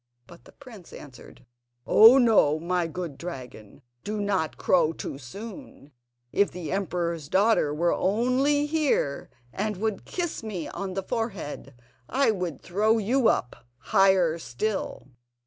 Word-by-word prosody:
But 170 +6 -16
the - - -16
prince 230 -10 -14
answered: 135 -4 -13 0.4
"Oh, 230 +5 +8
ho! 155 -10 +4
my 175 +1 -1
good 165 -3 -6
dragon, 125 - -9 0.2
do 210 +1 -4
not 195 -6 -1
crow 165 -3 +2
too 135 - -7
soon! 200 - -10 0.4
If 200 - +2
the 175 -3 -7
emperor's 170 -5 -2
daughter 200 -6 +3
were 170 +3 +1
only 255 +8 +1
here, 295 - 0 0.2
and 210 0 -2
would 215 -1 -3
kiss 345 -3 -4
me 200 -8 -5
on 195 -2 -6
the 195 - -2
forehead, 190 - -5 0.3
I 270 -1 +2
would 180 -8 -4
throw 215 +5 +2
you 235 +3 +2
up 125 - 0 0.2
higher 190 -3 +3
still!" 190 - -4
190 Hz, 135 wpm, -26 LUFS, 165-220 Hz, 0.4 s, Oh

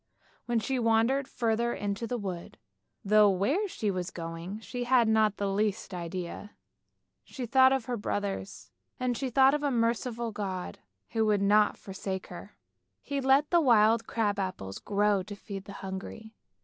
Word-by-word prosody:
Then 240 -1 +1
she 260 +3 -1
wandered 230 +4 +2
further 235 -2 0
into 205 +3 -3
the 245 - -2
wood, 185 -5 -6 0.5
though 210 +1 +6
where 225 - +1
she 215 - -2
was 180 -1 -3
going 170 +4 -6
she 245 +2 -5
had 245 -2 +4
not 220 -2 +3
the 200 - -1
least 205 0 -1
idea. 180 +3 -6 0.7
She 260 -3 -6
thought 260 +3 +5
of 265 -4 0
her 245 0 -2
brothers, 105 - -4 0.3
and 250 -1 0
she 265 +2 -2
thought 265 +2 +5
of 295 - 0
a 290 - +1
merciful 235 -1 -1
God 190 -3 -5 0.3
who 225 - +1
would 205 -2 +2
not 210 +1 +4
forsake 190 -1 -5
her. 200 +4 -11 0.5
He 280 -1 -2
let 270 +3 +3
the 345 -1 +5
wild 225 -4 +4
crab 205 -3 0
apples 100 - -4
grow 205 -1 +1
to 205 +3 -8
feed 195 -1 -8
the - - -9
hungry. 200 +3 -7
215 Hz, 165 wpm, -29 LUFS, 195-245 Hz, 0.7 s, though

